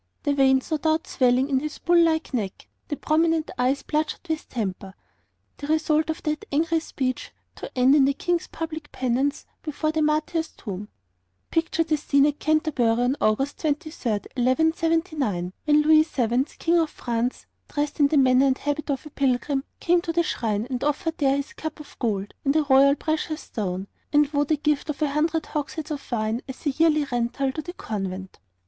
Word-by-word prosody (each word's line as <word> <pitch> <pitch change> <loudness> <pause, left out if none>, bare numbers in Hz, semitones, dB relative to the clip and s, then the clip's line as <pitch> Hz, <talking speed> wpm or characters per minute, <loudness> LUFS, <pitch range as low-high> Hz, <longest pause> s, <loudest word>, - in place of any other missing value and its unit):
the 285 - +1
veins 265 0 +3
no 310 - +2
doubt 315 +1 +1
swelling 255 +1 +2
on 270 -2 +1
his 305 +2 -5
bull 345 0 +4
like 320 -3 0
neck, 205 -6 -3 0.2
the 295 - -3
prominent 320 0 +1
eyes 260 +3 +1
bloodshot 305 +3 -2
with 315 -1 -3
temper, 195 -4 -4 0.6
the 285 - -6
result 310 0 +2
of 320 - -3
that 305 0 -2
angry 325 +3 +2
speech, 260 -5 -3 0.2
to - - -7
end 255 +2 +5
in 285 -2 +6
the 280 - +2
King's 350 +2 -1
public 315 -2 -6
penance 260 +3 -1 0.2
before 310 0 -2
the 315 0 0
martyr's 310 +2 +1
tomb. 205 -1 -7 0.6
Picture 330 0 +1
the 310 -1 0
scene 280 -1 +3
at 295 0 0
Canterbury 295 -7 +2
on 245 +2 +2
August 270 +7 +1
23, 310 -3 -2
1179, 275 - 0
when 300 0 +5
Louis 310 0 +6
VII., 245 -1 +1
King 340 +1 +2
of 320 -2 +1
France, 240 -1 -3 0.2
dressed 290 0 -2
in 290 - +6
the 295 - +1
manner 260 0 +5
and 265 -1 +2
habit 290 +1 -3
of 275 +1 -2
a 300 - -10
pilgrim, 270 0 0 0.2
came 350 0 +3
to 340 - -3
the 340 +1 +2
shrine 220 -8 -1
and 250 -1 -2
offered 300 +3 -1
there 275 -1 +3
his 280 - -5
cup 315 -1 -6
of 300 - -12
gold 205 -4 -1
and 275 +1 +1
a 310 - +4
royal 275 0 +5
precious 310 +1 -2
stone, 190 -4 -4 0.3
and 295 -1 +4
vowed 290 0 0
a 310 - +4
gift 300 +1 0
of 295 - -3
a 290 - +1
hundred 315 +2 0
hogsheads 305 +1 -4
of 290 -3 -6
wine 220 0 -1
as 265 - -9
a 290 - +2
yearly 305 0 +3
rental 245 +3 0
to 310 - -4
the 350 +3 -8
convent. 190 - -5
290 Hz, 190 wpm, -25 LUFS, 255-315 Hz, 0.6 s, in